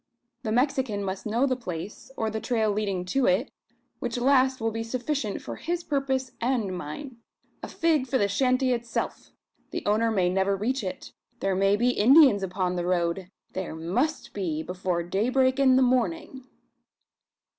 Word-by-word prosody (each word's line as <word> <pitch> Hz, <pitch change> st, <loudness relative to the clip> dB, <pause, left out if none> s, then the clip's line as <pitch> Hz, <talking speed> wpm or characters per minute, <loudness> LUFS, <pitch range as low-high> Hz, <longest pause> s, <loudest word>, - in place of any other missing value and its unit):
The 220 Hz, -4 st, -3 dB
Mexican 250 Hz, -4 st, +1 dB
must 190 Hz, +2 st, -4 dB
know 235 Hz, +5 st, +2 dB
the 260 Hz, -2 st, +1 dB
place, 185 Hz, -3 st, -7 dB
or 220 Hz, -1 st, -1 dB
the 220 Hz, -, -3 dB
trail 220 Hz, -4 st, +1 dB
leading 200 Hz, -3 st, -2 dB
to 260 Hz, +8 st, +1 dB
it; 185 Hz, +1 st, +2 dB, 0.5 s
which 240 Hz, -1 st, -3 dB
last 260 Hz, +1 st, +3 dB
will 225 Hz, 0 st, 0 dB
be 225 Hz, +1 st, -3 dB
sufficient 245 Hz, -1 st, -3 dB
for -, -, -6 dB
his 345 Hz, +1 st, -3 dB
purpose 265 Hz, -3 st, -1 dB
and 230 Hz, -6 st, 0 dB
mine. 230 Hz, -, -7 dB, 0.4 s
A -, -, -5 dB
fig 315 Hz, -5 st, +1 dB
for 260 Hz, -, +1 dB
the 205 Hz, -, +2 dB
shanty 255 Hz, +5 st, +2 dB
itself! 235 Hz, -1 st, -4 dB, 0.4 s
The -, -, -5 dB
owner 220 Hz, +2 st, +2 dB
may 190 Hz, -5 st, +2 dB
never 190 Hz, +2 st, +1 dB
reach 240 Hz, +5 st, -1 dB
it. 185 Hz, -, -6 dB, 0.3 s
There 195 Hz, -, 0 dB
may 195 Hz, +2 st, +3 dB
be 240 Hz, +4 st, +2 dB
Indians 255 Hz, -1 st, +6 dB
upon 185 Hz, -1 st, -1 dB
the 175 Hz, -, -1 dB
road! 175 Hz, +1 st, 0 dB, 0.2 s
There 185 Hz, -4 st, -4 dB
must 220 Hz, -, -2 dB
be, 165 Hz, -6 st, -2 dB
before 180 Hz, -1 st, -2 dB
daybreak 255 Hz, +9 st, +1 dB
in 260 Hz, -2 st, +5 dB
the 260 Hz, -, +5 dB
morning!" 250 Hz, +1 st, 0 dB
225 Hz, 165 wpm, -26 LUFS, 190-260 Hz, 0.5 s, Indians